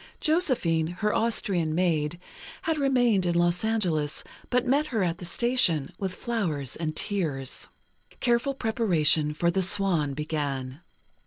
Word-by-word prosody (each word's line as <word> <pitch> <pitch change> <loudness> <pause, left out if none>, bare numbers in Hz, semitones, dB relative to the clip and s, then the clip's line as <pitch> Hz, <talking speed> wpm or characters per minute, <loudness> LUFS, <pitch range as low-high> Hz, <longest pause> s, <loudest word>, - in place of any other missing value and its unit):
Josephine, 255 - +1
her 210 +5 -1
Austrian 185 -8 0
maid, 170 -2 0 0.4
had 320 -2 0
remained 245 -8 +3
in 170 - 0
Los 175 +2 +2
Angeles, 175 -10 -1 0.3
but 250 0 +1
met 285 +4 +2
her 225 -8 0
at 170 -1 -1
the 175 - -5
station, 175 - +2
with 190 -2 -3
flowers 165 - -2
and 155 -2 -3
tears. 155 -11 -2 0.5
Careful 245 +3 +1
preparation 175 - +2
for 170 +3 +1
"The 190 - 0
Swan" 175 -7 +2
began. 145 -2 -3
175 Hz, 135 wpm, -26 LUFS, 155-230 Hz, 0.5 s, remained